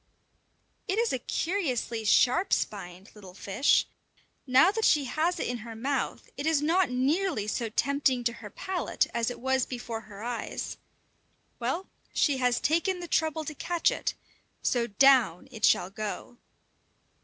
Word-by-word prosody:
It 390 +1 -1
is 465 0 +1
a 260 - -1
curiously 255 - -2
sharp 255 - +4
spined 190 -1 -3
little 190 -4 -13
fish! 200 +8 +2 0.6
Now 265 +9 +6
that 445 +2 -2
she 295 -8 +4
has 320 +7 0
it - - -1
in 245 - -2
her 225 0 -8
mouth, 265 +4 -2
it 285 +3 -2
is 320 -2 +3
not 340 +5 +2
nearly 275 - 0
so 225 +2 -2
tempting 275 +1 +1
to 235 0 0
her 220 -2 -10
palate 375 - -1
as 235 0 0
it 245 - -7
was 265 0 +1
before 240 -3 -5
her 210 -1 -11
eyes. 240 -1 -4 0.8
Well, 265 +11 -2 0.3
she 285 -3 +3
has 250 -2 +2
taken 340 +4 +1
the 350 - -6
trouble 315 -1 0
to 305 - -5
catch 340 +3 +1
it, - - -2 0.5
so 240 -2 +1
down 240 -5 +4
it 220 -4 -10
shall 180 - +3
go! 215 +3 -6
260 Hz, 155 wpm, -28 LUFS, 230-320 Hz, 0.8 s, Now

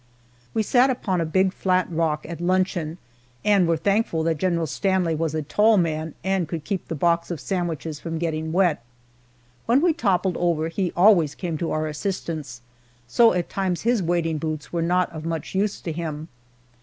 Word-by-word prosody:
We 220 - +2
sat 250 +5 +4
upon 195 -8 -1
a 165 - -1
big, 190 +3 +2
flat 185 -2 +1
rock 160 -2 0
at 170 0 -7
luncheon, 180 -3 0 0.5
and 200 -4 +4
were 165 -1 +2
thankful 195 -1 +1
that 160 -2 0
General 170 -2 +1
Stanley 185 +1 0
was 160 0 -1
a 155 - -1
tall 210 +8 +3
man 160 -3 -1
and 190 -2 0
could 165 -2 -5
keep 195 +2 -3
the 165 - -3
box 170 +2 +1
of 170 -4 -4
sandwiches 165 -1 -3
from 165 +1 -4
getting 160 -1 -2
wet. 175 -7 +2 0.8
When 240 +4 +5
we 335 +2 +3
toppled 190 - +1
over 165 -2 0
he 180 +1 -1
always 175 -6 +5
came 170 -4 -3
to 170 - -2
our 155 0 -1
assistance, 155 - -4 0.5
so 230 - +5
at 180 -1 -1
times 185 -3 -2
his 235 -2 +2
wading 165 -2 0
boots 155 0 -4
were 170 - 0
not 180 +2 +1
of 155 -1 -7
much 165 -2 -4
use 195 +2 0
to 165 - -4
him. 160 -1 -5
170 Hz, 185 wpm, -24 LUFS, 160-190 Hz, 0.8 s, When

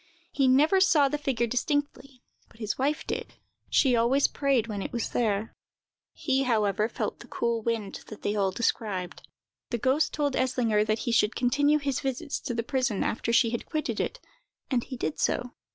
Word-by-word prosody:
He 270 -2 +2
never 305 +9 +4
saw 305 -7 +5
the 295 - -2
figure 260 -5 0
distinctly, 275 +1 -2 0.3
but - - -21
his 215 -2 -3
wife 295 +4 -1
did: - - -4 0.3
she 260 -4 +4
always 240 +5 +3
prayed 275 -5 +1
when 210 -3 -4
it - - -5
was 235 - -2
there. 220 -2 0 0.6
He, 270 -2 0
however, 215 -4 +1
felt - - -4
the - - -12
cool 235 -1 -1
wind 220 -3 -2
that 215 - -11
they 205 - 0
all 195 -2 +2
described. 190 -3 -2 0.5
The 240 - -1
ghost 265 +6 +2
told 290 -2 -1
Eslinger 245 -5 +2
that 215 0 +1
he 240 - 0
should 225 -1 +2
continue 285 +4 +3
his 280 -2 -1
visits 275 +2 -3
to 245 -4 -4
the 230 - -1
prison 250 -5 0
after 230 - -1
she 230 0 +4
had 235 - -4
quitted 310 -1 -2
it, - - -2 0.5
and 245 -3 +1
he 260 - -7
did 155 -7 -3
so. 245 0 0
245 Hz, 185 wpm, -27 LUFS, 225-275 Hz, 0.6 s, saw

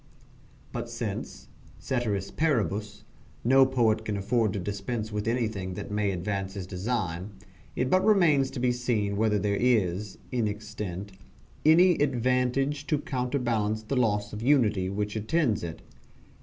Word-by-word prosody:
But - - -4
since, - - -5 0.3
ceteris 105 -6 -2
paribus, 105 -9 -1 0.4
no 135 +2 +6
poet 115 -4 +2
can 105 -2 -2
afford 110 +2 +1
to 100 - -2
dispense 105 +4 -4
with 105 +1 -3
anything 110 -6 -1
that - - -6
may 105 -1 +1
advance 95 +1 -3
his 95 -2 -4
design, 95 -1 -3 0.4
it 125 - 0
but 185 +7 +3
remains 170 -10 +4
to - - -6
be 125 0 +2
seen 115 -5 -1
whether 105 0 +2
there 100 0 0
is, 105 -5 +1
in 120 -4 +1
extent, 105 -2 -5 0.5
any 170 +3 +6
advantage 130 +2 +1
to 150 - +2
counterbalance 125 -6 -1
the 125 +6 -3
loss 105 -5 +1
of 105 - -5
unity 110 -8 +3
which 105 +2 -2
attends 110 - +1
it. 80 -2 -6
110 Hz, 140 wpm, -28 LUFS, 100-125 Hz, 0.5 s, no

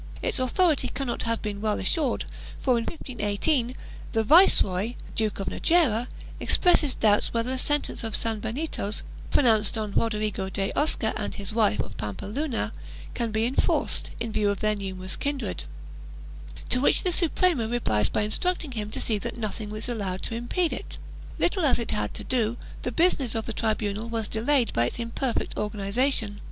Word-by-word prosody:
Its 460 - +1
authority 300 +5 +2
cannot 260 -4 -3
have 230 0 -1
been 205 -2 -4
well 215 -1 0
assured 270 - +1 0.3
for, 260 - +1
in 235 -2 +2
1518, 245 -1 0 0.4
the 225 -1 +2
Viceroy, 225 - +5 0.2
Duke 215 -2 -1
of 195 - -2
Najera, 255 - +2 0.3
expresses 310 -7 +3
doubts 210 +1 +2
whether 230 +2 0
a 260 - -1
sentence 290 -1 -1
of 225 -1 -2
sanbenitos, 225 0 -3 0.3
pronounced 225 -5 +3
on 215 -2 -3
Rodrigo 210 -3 0
de 195 0 -2
Osca 290 -7 +1
and 210 - -3
his 200 0 -5
wife, 215 -2 +2
of 100 - -8
Pampeluna, 200 - -3 0.4
can 235 -1 -1
be 220 +1 +1
enforced, 250 +3 +1
in 230 -1 -2
view 210 -1 +1
of 200 - -1
their 215 0 +2
numerous 190 -2 -5
kindred, 270 - -3 1.0
to 250 - +4
which - - +4
the 365 - +3
Suprema 335 - +2
replies 110 - +1
by - - 0
instruct 355 +14 +1
ing 280 - -8
him 215 -4 -4
to - - -5
see 215 -3 0
that 235 +3 -5
nothing 215 -1 -4
is 215 - -2
allowed 200 -6 -3
to - - -3
impede 240 +9 0
it. - - -6 0.4
Little 365 0 +1
as 285 - +4
it 235 - -2
had 105 0 -2
to - - -4
do, 235 -2 0 0.2
the 250 - -2
business 275 -5 +2
of 225 - -2
the 230 - -4
tribunal 215 0 -1
was 225 -2 -2
delayed 240 +3 +1
by 115 +1 +2
its - - -4
imperfect 235 +2 -2
organization. 210 +1 0
225 Hz, 170 wpm, -26 LUFS, 210-260 Hz, 1.0 s, Viceroy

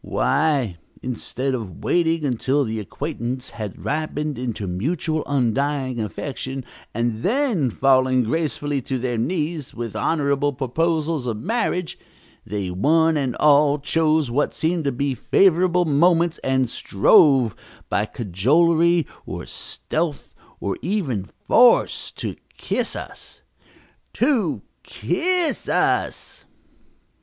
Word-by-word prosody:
Why, 135 - +1 0.3
instead 130 +2 -3
of 110 -9 -6
waiting 165 -2 +1
until 135 +2 +1
the 110 -3 -3
acquaintance 130 +2 -4
had 105 -4 -7
ripened 150 -2 -2
into 115 -5 -3
mutual 155 - -2
undying 135 0 0
affection 130 +5 -5 0.3
and 115 -1 -2
then 220 - +1
falling 130 +1 +3
gracefully 145 +1 -1
to 130 +2 -3
their 120 -2 -2
knees 155 +1 -2
with 115 -2 -5
honorable 140 +3 +1
proposals 155 +2 -1
of 115 -3 -2
marriage, 180 - -2 0.4
they 100 -3 -4
one 160 - +3
and 135 -5 -1
all 145 -1 +4
chose 155 -2 +1
what 145 +5 0
seemed 160 0 0
to 140 - +1
be 135 +2 -1
favorable 180 +4 +3
moments 165 +2 +3
and 130 -1 +1
strove, 120 - +4 0.3
by 105 +1 0
cajolery 160 - +2 0.2
or - - -6
stealth 155 -3 -4 0.3
or 100 -1 -3
even 150 - -1 0.2
force, 245 0 +4
to - - -5 0.2
kiss - - -2
us. - - -9 0.7
To 240 - +1 0.2
kiss 360 -2 -1
us!" - - 0
140 Hz, 110 wpm, -22 LUFS, 120-165 Hz, 0.7 s, all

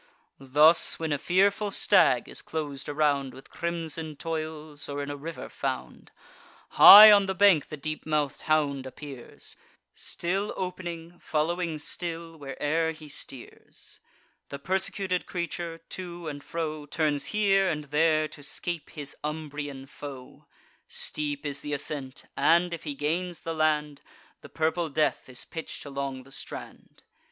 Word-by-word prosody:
Thus, 150 +5 +5
when 160 -1 -3
a 145 - 0
fearful 200 +5 +2
stag - - +3
is - - -6
clos'd 145 -3 -5
around 145 -3 0
With 135 - -14
crimson 165 -2 -4
toils, 155 -1 -5
or 145 0 -3
in 145 - -5
a - - -4
river 160 +4 -7
found, - - -5 0.6
High 210 +1 +11
on 200 -1 +5
the 190 - -2
bank 195 -7 +5
the 155 - -7
deep 155 +2 -5
mouth'd 150 -3 0
hound 145 -4 0
appears, 135 -1 -10 0.4
Still 195 +4 -3
opening, 175 -2 -6
following 165 +1 -1
still, 165 +1 -5
where'er 155 +3 -1
he 155 -1 -12
steers; 135 -3 -9 0.5
The 140 - -5
persecuted 190 +3 -1
creature, 170 -1 -4
to 175 -2 -7
and 145 -2 -6
fro, 155 -3 -4
Turns 145 -2 0
here 195 -2 +2
and 150 -1 -2
there, 155 +2 +2
to 150 - -11
scape 165 +3 -4
his 145 -3 -6
Umbrian 145 -3 -5
foe: 135 -2 -10 0.4
Steep 145 -1 -3
is 145 -1 -3
th' 145 - -4
ascent, 140 -2 -5
and, 170 +4 +3
if 165 - -7
he 145 -2 -4
gains 170 +5 -2
the 165 - -4
land, 150 -2 0 0.4
The - - -12
purple 160 +1 -1
death 150 -2 0
is 125 - -6
pitch'd 165 -2 -7
along 135 -2 -4
the 135 - -18
strand. - - -10
155 Hz, 145 wpm, -27 LUFS, 145-170 Hz, 0.6 s, High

